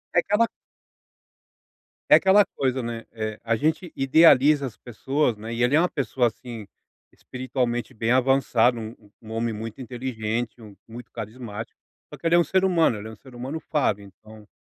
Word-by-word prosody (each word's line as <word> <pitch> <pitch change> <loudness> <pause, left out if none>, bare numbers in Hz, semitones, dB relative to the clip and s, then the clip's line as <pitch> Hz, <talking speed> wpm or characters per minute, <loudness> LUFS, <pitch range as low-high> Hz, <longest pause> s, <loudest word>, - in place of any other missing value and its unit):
É - - +7
aquela 210 +6 +2 1.6
é - - +9
aquela 195 +1 +5
coisa, 130 -4 -2
né, 115 -1 -5
eh, 110 -1 -4
a 115 0 +1
gente 160 +4 -1
idealiza 145 0 +5
as 120 -5 -7
pessoas, 130 +2 -1
né, 110 +2 -7
e 115 - -3
ele 125 +4 +3
é - - +5
uma 180 - +2
pessoa, 125 -3 0
assim, 115 -1 -8 0.5
espiritualmente 125 -1 -3
bem 115 +1 -1
avançado, 125 -2 +3
um 110 -2 -10
um 110 -1 -11
homem 115 0 -1
muito 110 +4 -7
inteligente, 120 -2 -4
um 105 -2 -12
muito 120 +2 -11
carismático, 115 -1 -7 0.3
só - - -9
que - - -16
ele 165 - +4
é - - +6
um 170 - +3
ser 190 0 +1
humano, 170 - +3
ele 105 +2 -8
é - - -9
um - - -11
ser 130 0 -16
humano 135 +6 -5
falho 140 -10 0
então 105 +2 -16
120 Hz, 180 wpm, -24 LUFS, 110-140 Hz, 1.6 s, é